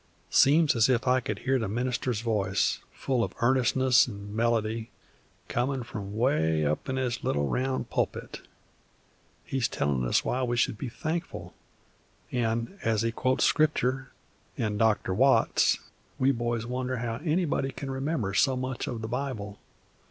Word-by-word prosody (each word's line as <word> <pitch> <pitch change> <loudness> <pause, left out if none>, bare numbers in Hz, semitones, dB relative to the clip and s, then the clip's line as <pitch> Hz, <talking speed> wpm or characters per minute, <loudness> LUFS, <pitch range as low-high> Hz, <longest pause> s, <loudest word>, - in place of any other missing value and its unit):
"Seems 150 0 +5
as 115 +2 +4
if 125 -1 +1
I 130 +1 +4
could 105 -4 -4
hear 135 0 +2
the 110 - -2
minister's 120 +1 -1
voice, 100 -4 0
full 130 -4 -1
of - - -4
earnestness 130 0 +4
an' 100 -1 -8
melody, 115 -1 0 0.6
comin' 130 +1 -1
from 105 -3 -7
'way 80 - +2
up 75 - -1
in 130 - -1
his 125 -2 -2
little 70 0 0
round 130 - -2
pulpit. - - -2 1.0
He 135 - -3
is 125 - +2
tellin' 70 -3 -1
us - - +1
why 130 - 0
we 120 -1 0
should 115 - +2
be 130 - -4
thankful, 160 +7 -4 0.8
an', 115 - -1
as 115 -1 +1
he 115 - +1
quotes 130 +3 +1
Scriptur' 135 -4 +1 0.5
an' 105 -2 -1
Dr. 110 -4 +2
Watts, 135 +7 +4 0.4
we 130 +1 +3
boys 120 -2 -2
wonder 125 +1 -2
how 115 -1 -3
anybody 155 -4 0
can 135 +1 -6
remember 135 -7 -2
so 130 +6 +3
much 130 0 -3
of 115 -2 -4
the - - -2
Bible. 115 -5 -4
120 Hz, 155 wpm, -28 LUFS, 110-130 Hz, 1.0 s, Seems